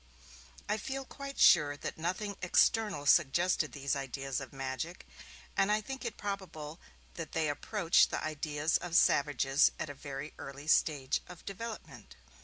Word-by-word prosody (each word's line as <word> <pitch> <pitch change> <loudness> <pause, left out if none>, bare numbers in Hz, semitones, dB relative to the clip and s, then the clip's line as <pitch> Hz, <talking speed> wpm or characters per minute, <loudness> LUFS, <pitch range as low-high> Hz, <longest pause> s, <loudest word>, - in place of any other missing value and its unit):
I - - 0
feel 270 +4 -4
quite 275 +1 -8
sure 145 -4 +6
that - - -5
nothing 185 +5 -3
external 190 -2 +2
suggested 170 +2 +3
these 140 0 -2
ideas 135 0 -3
of 130 - -8
magic, 135 +6 -5 0.5
and 195 +1 +3
I 210 - +3
think 265 +5 -7
it 235 - -4
probable 180 -6 -5 0.3
that 165 -2 -7
they 160 -1 +1
approached 170 +4 +3
the - - -3
ideas 155 0 0
of 175 -1 -5
savages 140 -2 +4
at 150 - -3
a - - -7
very 140 +1 -7
early 140 +1 -8
stage 145 -3 +2
of 180 -2 -12
development. 220 - -8
155 Hz, 150 wpm, -32 LUFS, 145-195 Hz, 0.5 s, sure